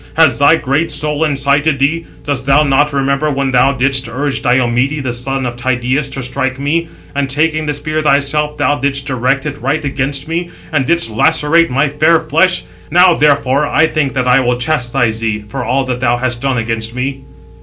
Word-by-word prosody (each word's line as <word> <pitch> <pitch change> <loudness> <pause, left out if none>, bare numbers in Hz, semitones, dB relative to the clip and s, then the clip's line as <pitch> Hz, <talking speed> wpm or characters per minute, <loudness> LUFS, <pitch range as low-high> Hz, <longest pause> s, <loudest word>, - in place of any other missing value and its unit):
Has 160 -3 +3
thy 145 +3 +5
great 150 +2 -1
soul 150 0 0
incited 140 0 +1
thee? 155 +4 0 0.2
Dost 140 -2 -3
thou 140 +2 +4
not 145 +1 +2
remember 140 +2 0
when 135 -1 -1
thou 130 +2 +3
didst 135 0 0
urge 140 +4 -2
Diomede, 125 +2 +1
the 125 -2 -2
son 130 +2 -3
of 120 -1 -4
Tydeus, 130 +3 -1
to 135 -1 -5
strike 130 +1 -2
me? 155 +5 -1 0.3
And 140 -1 -1
taking 155 +2 0
the 150 - 0
spear 155 +2 -3
thyself, 150 +1 +1
thou 145 0 +1
didst 140 0 -1
direct 135 +1 -1
it 145 -1 -5
right 145 +5 -1
against 140 +1 -2
me, 170 +2 -3 0.2
and 140 -5 0
didst 170 -8 +2
lacerate 160 +7 +2
my 140 +4 +1
fair 155 +3 +2
flesh. 165 +4 +1 0.3
Now, 180 +2 +5
therefore, 145 -2 +2
I 160 - +3
think 150 -4 -1
that 125 -1 0
I 125 +1 +5
will 125 -1 0
chastise 125 -4 -1
thee, 110 -2 -2
for 130 +4 -5
all 130 +3 0
that 125 -1 -3
thou 120 -1 +1
hast 120 -1 -3
done 135 -2 0
against 115 0 -3
me." 135 +2 -3
140 Hz, 195 wpm, -14 LUFS, 130-150 Hz, 0.3 s, thy